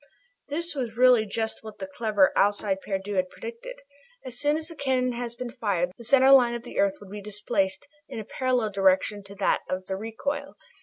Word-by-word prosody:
This 335 +4 -3
was 240 -6 -4
really 250 -3 +6
just 220 +2 -2
what 215 -1 -9
the 190 - -5
clever 205 0 +2
Alcide 200 -1 +2
Pierdeux 195 0 -3
had 185 0 +1
predicted. 480 - -9 0.4
As 250 -1 -5
soon 295 +1 +2
as 315 - -6
the 335 - -9
cannon 260 -3 +1
has 240 -1 -4
been 240 0 -5
fired 200 -8 0
off, 180 - -19
the 235 - -12
center 265 +3 +5
line 245 -3 +6
of 235 - -6
the - - -6
earth 295 0 +3
would 200 -2 -13
be 205 0 -6
displaced 200 -1 -1 0.2
in - - -7
a 215 - -6
parallel 250 -4 0
direction 195 +1 +2
to 200 0 -11
that 195 -1 +1
of 185 0 -3
the 190 - -3
recoil. 280 +8 -4
225 Hz, 210 wpm, -26 LUFS, 200-260 Hz, 0.4 s, really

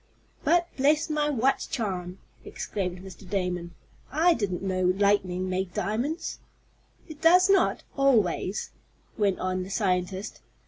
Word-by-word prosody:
"But, 345 0 +3
bless 300 +4 +2
my 300 -1 +1
watch 270 0 +1
charm!" 185 -6 -3 0.3
exclaimed 180 -3 -4
Mr. 190 -1 -12
Damon, 180 -3 -2 0.4
"I 330 +5 +4
didn't 195 - -2
know 185 -1 0
lightning 185 -3 +1
made 185 -1 -2
diamonds." 240 - -2 0.7
"It 310 -1 -11
does 360 +4 +6
not 390 - +3
always," 215 - +1 0.4
went 200 -4 +1
on 185 0 -2
the 185 - -6
scientist. 190 -1 -1
200 Hz, 125 wpm, -27 LUFS, 185-280 Hz, 0.7 s, does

